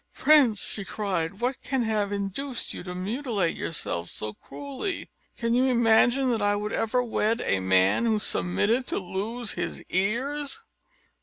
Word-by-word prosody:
"Prince!" 275 -9 +5
she 200 - -4
cried, 195 -2 -3
"what 250 +2 -1
can 265 -2 -1
have 210 -2 0
induced 205 +6 -3
you - - -6
to 180 0 -6
mutilate 205 - -1
yourself 85 - -3
so 105 0 -4
cruelly? 280 - -5 0.3
Could 230 0 0
you 250 +2 +4
imagine 245 +2 +4
that 225 -3 0
I 205 0 +3
would 210 +1 -3
ever 250 +3 +1
wed 225 -1 0
a 95 - +2
man 95 - +3
who 220 -1 +3
submitted 205 - +1
to - - -1
lose 210 +5 -3
his 175 - -4
ears?" 275 - -1
220 Hz, 155 wpm, -26 LUFS, 190-250 Hz, 0.3 s, Prince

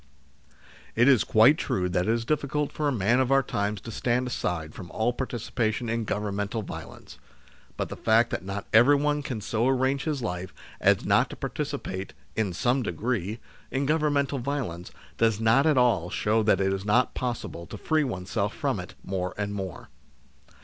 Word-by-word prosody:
It 120 +3 +4
is 130 -6 +6
quite 115 +8 +5
true 90 -1 0
that 90 +2 0
it - - +3
is 115 0 0
difficult 150 +1 -1
for 150 - -1
a - - +2
man 120 +1 +2
of 130 0 +1
our 135 0 +5
times 100 -2 -2
to 115 - -8
stand 125 +3 0
aside 90 -10 -3
from 90 - -9
all 115 +3 0
participation 120 -2 -2
in 115 -1 -1
Governmental 105 +1 -2
violence. - - -9 0.6
But - - -2
the - - -5
fact 115 +2 +3
that - - -3
not 100 +1 -5
everyone 145 +5 +5
can 125 -6 -4
so 115 +4 0
arrange 135 +2 +1
his 150 -5 -2
life 90 -3 -4 0.2
as - - +3
not - - +3
to - - -7
participate, 95 +1 -4 0.2
in 110 -4 0
some 125 +9 +1
degree, 110 -3 -2 0.3
in 135 +1 -1
Governmental 145 -2 +1
violence, 120 -10 -3 0.3
does 115 -2 +3
not 115 +7 +4
at 150 -3 +3
all 115 -9 +3
show 110 +4 +1
that 105 - +3
it 95 0 +1
is 95 0 -3
not 120 +5 +2
possible 120 -8 -4
to - - -8
free 155 -1 +1
oneself 95 -8 -2
from - - -1
it - - -8
more 95 -1 -3
and 100 -1 -2
more. 95 -4 -6
115 Hz, 180 wpm, -27 LUFS, 100-135 Hz, 0.6 s, is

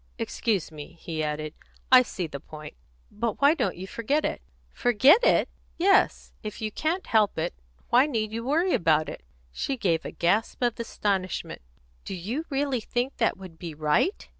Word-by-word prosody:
"Excuse 205 -8 -1
me," 155 +2 -9
he 165 -2 -4
added. 150 0 -3 0.4
"I 255 -1 +10
see 190 -7 -4
the 145 -3 -6
point. 155 +2 -10 0.4
But 220 +1 -2
why 285 +2 +6
don't 200 - -1
you 185 - -6
forget 255 +10 -1
it?" - - -2 0.3
"Forget 260 - +5
it!" - - +4 0.3
"Yes. 385 +3 +3
If 215 -1 -6
you 215 -1 -3
can't 325 - -1
help 215 -2 +2
it, 165 +2 -1 0.4
why 255 +4 +6
need 220 -6 -2
you 230 +1 -4
worry 330 +8 +1
about 155 -2 +2
it?" - - -8 0.3
She 270 - -3
gave 175 -8 +1
a - - -25
kind - - -12
of - - -34
gasp 210 +8 +1
of 240 -1 0
astonishment. 195 -5 -2 0.4
"Do 195 - -5
you 225 - -4
really 275 -2 0
think 245 +5 -2
that 225 - +1
would 185 -4 -12
be 165 -3 -6
right?" 155 - +1
215 Hz, 185 wpm, -26 LUFS, 170-260 Hz, 0.4 s, I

